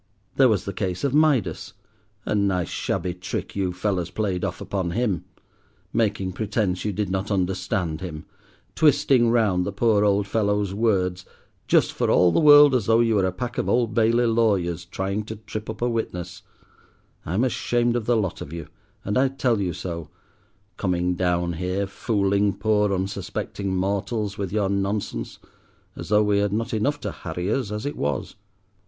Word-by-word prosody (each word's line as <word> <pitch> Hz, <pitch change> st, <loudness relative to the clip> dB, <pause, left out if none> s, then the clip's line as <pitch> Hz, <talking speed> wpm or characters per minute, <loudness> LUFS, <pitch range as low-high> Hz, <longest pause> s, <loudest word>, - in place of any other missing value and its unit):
There 130 Hz, -2 st, +5 dB
was 105 Hz, -4 st, +1 dB
the 100 Hz, -, -4 dB
case 90 Hz, -1 st, -3 dB
of 140 Hz, -2 st, 0 dB
Midas; 150 Hz, -7 st, +2 dB, 0.5 s
a -, -, -1 dB
nice, 100 Hz, -4 st, +1 dB
shabby 90 Hz, -, -2 dB
trick 90 Hz, +1 st, -5 dB
you 95 Hz, -2 st, 0 dB
fellows 90 Hz, -1 st, -2 dB
played 90 Hz, -1 st, -2 dB
off -, -, -3 dB
upon 95 Hz, -3 st, -2 dB
him! 105 Hz, -6 st, -1 dB, 0.7 s
making 100 Hz, -4 st, 0 dB
pretence 100 Hz, -1 st, -1 dB
you 105 Hz, -, -1 dB
did 100 Hz, -1 st, -2 dB
not 95 Hz, +2 st, -2 dB
understand 90 Hz, -4 st, -1 dB
him, 80 Hz, -4 st, -6 dB, 0.5 s
twisting 135 Hz, -5 st, +4 dB
round 105 Hz, -6 st, +2 dB
the 100 Hz, -, -3 dB
poor 105 Hz, +1 st, +2 dB
old 100 Hz, -1 st, +2 dB
fellow's 105 Hz, -1 st, 0 dB
words, 95 Hz, -4 st, 0 dB, 0.4 s
just -, -, +3 dB
for -, -, 0 dB
all 90 Hz, -1 st, +5 dB
the -, -, +2 dB
world 145 Hz, -2 st, +8 dB
as 125 Hz, -6 st, +1 dB
though 115 Hz, 0 st, +4 dB
you 115 Hz, -1 st, +3 dB
were 100 Hz, -3 st, +2 dB
a -, -, -1 dB
pack 120 Hz, +6 st, -4 dB
of -, -, -1 dB
Old 120 Hz, -3 st, +1 dB
Bailey 115 Hz, +2 st, +3 dB
lawyers, 105 Hz, -8 st, +1 dB
trying 100 Hz, +2 st, -3 dB
to 110 Hz, -, -6 dB
trip 110 Hz, 0 st, -7 dB
up 110 Hz, +2 st, -5 dB
a -, -, +2 dB
witness; 90 Hz, -7 st, -4 dB, 0.8 s
I'm 95 Hz, +9 st, 0 dB
ashamed 120 Hz, -1 st, +1 dB
of 120 Hz, -3 st, -2 dB
the 120 Hz, -1 st, +3 dB
lot 95 Hz, -5 st, -2 dB
of 70 Hz, -, -7 dB
you, 80 Hz, -2 st, -7 dB, 0.4 s
and 105 Hz, +5 st, +1 dB
I 135 Hz, -, +4 dB
tell 125 Hz, -5 st, 0 dB
you 90 Hz, -2 st, -1 dB
so—coming 90 Hz, +2 st, -5 dB
down 90 Hz, -1 st, 0 dB
here, 90 Hz, +4 st, -2 dB
fooling 100 Hz, 0 st, 0 dB
poor 105 Hz, -1 st, +2 dB
unsuspecting 95 Hz, 0 st, -3 dB
mortals 100 Hz, +2 st, -1 dB
with 100 Hz, -3 st, -4 dB
your 105 Hz, -1 st, +1 dB
nonsense, 100 Hz, +1 st, -2 dB, 0.6 s
as -, -, -8 dB
though 105 Hz, 0 st, +4 dB
we 105 Hz, -1 st, +2 dB
had 100 Hz, 0 st, 0 dB
not 115 Hz, +3 st, -2 dB
enough 140 Hz, +7 st, 0 dB
to -, -, -3 dB
harry 90 Hz, +3 st, -4 dB
us 130 Hz, -5 st, -1 dB
as 105 Hz, +3 st, -4 dB
it 145 Hz, -, -3 dB
was. 70 Hz, -2 st, -2 dB
100 Hz, 175 wpm, -24 LUFS, 90-110 Hz, 0.8 s, world